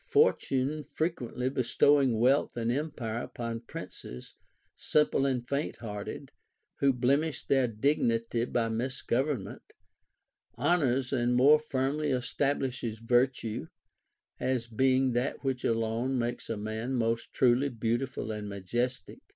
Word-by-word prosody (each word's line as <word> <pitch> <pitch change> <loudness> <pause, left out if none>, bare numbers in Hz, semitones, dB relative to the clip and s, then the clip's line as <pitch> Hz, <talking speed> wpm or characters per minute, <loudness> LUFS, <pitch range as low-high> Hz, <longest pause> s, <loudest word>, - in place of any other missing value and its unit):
Fortune 150 - +2
frequently 130 -6 -2
bestowing 130 0 +3
wealth 130 +5 +2
and 115 0 0
empire 125 -5 -3
upon 115 -2 -5
princes 60 - -9 0.4
simple 145 -2 +2
and 125 -3 -1
faint 140 +3 -2
hearted, 105 -3 -6 0.5
who 140 -1 +4
blemish 140 +5 0
their 135 -2 +3
dignity 115 -1 +1
by 120 -2 0
misgovernment, 125 -1 -2 0.9
honors 135 -6 +1
and 120 -1 +2
more 145 +5 +6
firmly 145 +1 -1
establishes 130 -3 -1
virtue, 120 -4 0 0.7
as 130 -3 0
being 130 +3 +2
that 120 +5 -1
which 130 -2 -1
alone 115 +3 0
makes 120 0 -3
a 115 - -2
man 110 +5 -3
most 115 -1 -1
truly 130 +2 +3
beautiful 120 0 -2
and 105 -1 -5
majestic. 120 +6 -3
125 Hz, 115 wpm, -30 LUFS, 115-135 Hz, 0.9 s, more